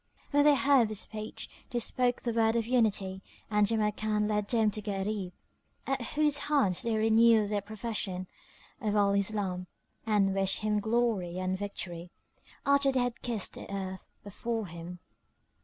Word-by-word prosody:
When 290 0 +4
they 295 -1 +7
heard 275 -5 +4
his 215 -1 -2
speech, 215 0 -5 0.2
they 245 - -3
spoke 245 +1 0
the 235 - -1
word 225 0 +2
of 230 -1 +1
Unity 210 -6 +1 0.3
and 210 -1 +3
Jamrkan 210 -1 0
led 210 -1 0
them 220 -2 +2
to 215 - -3
Gharib, 200 -2 -3 0.5
at 270 -1 -1
whose 295 -1 +4
hands 260 - +2
they 230 -1 0
renewed 220 -1 +5
their 205 -1 0
profession 210 -3 -4 0.6
of 210 -2 0
Al 200 -1 +3
Islam 200 -3 -1 0.4
and 200 -3 +3
wished 195 +1 +2
him 210 0 +1
glory 220 -5 0
and 185 0 -1
victory, 180 -3 -5 0.6
after 280 0 +4
they 260 -1 +1
had 245 -1 -2
kissed 230 -5 -1
the - - -9
earth 190 -1 -5
before 220 +2 -3
him. 170 0 -8
215 Hz, 155 wpm, -30 LUFS, 195-235 Hz, 0.6 s, they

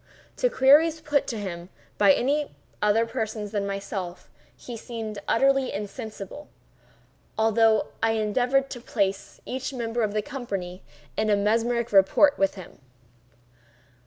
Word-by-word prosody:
To - - +2
queries 305 - +5
put 295 -2 0
to 230 - -3
him 180 -3 -6 0.3
by 200 -2 +7
any 285 +6 0 0.3
other 210 +2 +3
person 220 -3 -4
than 205 -1 -2
myself 195 -2 -5 0.3
he 240 - -8
seemed 220 -2 -6
utterly 270 +2 +3
insensible—although 220 0 -3
I 225 0 +2
endeavored 245 +5 +1
to 245 - -6
place 200 -4 -2
each 260 +2 -4
member 235 -1 -2
of 215 -1 -1
the 210 - 0
company 195 -9 -5 0.3
in 215 - 0 0.2
mesmeric 235 +2 +1
rapport 200 +9 +5
with 195 0 +1
him. 185 -3 -12
225 Hz, 125 wpm, -25 LUFS, 205-255 Hz, 0.3 s, by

